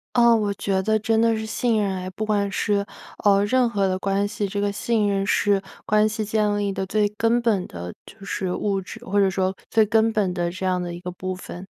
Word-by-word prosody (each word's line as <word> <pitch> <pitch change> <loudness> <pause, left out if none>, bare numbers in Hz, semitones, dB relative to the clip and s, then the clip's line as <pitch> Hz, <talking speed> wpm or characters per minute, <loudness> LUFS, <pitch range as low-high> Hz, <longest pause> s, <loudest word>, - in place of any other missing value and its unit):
啊， 235 -1 +6
我 210 -2 0
觉 190 -1 0
得 220 +2 +2
真 220 +1 +1
的 230 0 +3
是 220 - -4
信 220 0 0
任 195 -1 0
哎。 185 0 -5
不 215 +4 -4
管 205 -2 0
是， 205 0 0 0.4
呃， 200 -1 +4
任 250 +2 +2
何 200 -4 +1
的 185 0 0
关 200 +1 0
系， 205 -1 -3
这 200 +1 -3
个 205 0 0
信 215 +1 0
任 195 -1 0
是 200 0 +2 0.2
关 215 0 +3
系 215 0 -3
建 210 -1 +1
立 205 -1 0
的 190 - -2
最 210 +1 +2
根 230 +2 +2
本 215 -6 +1
的 90 0 -7
就 - - -15
是 190 -2 -2
物 200 0 -1
质， 185 - -10
或 200 +2 +1
者 195 -1 +4
说 190 0 -1
最 220 -1 +4
根 225 +1 +3
本 200 -4 +1
的 175 -1 -1
这 185 +1 -5
样 185 -1 +1
的 175 -1 -4
一 175 - -7
个 180 0 -6
部 185 +1 -5
分。 185 0 -9
205 Hz, 260 characters per minute, -23 LUFS, 190-215 Hz, 0.4 s, 啊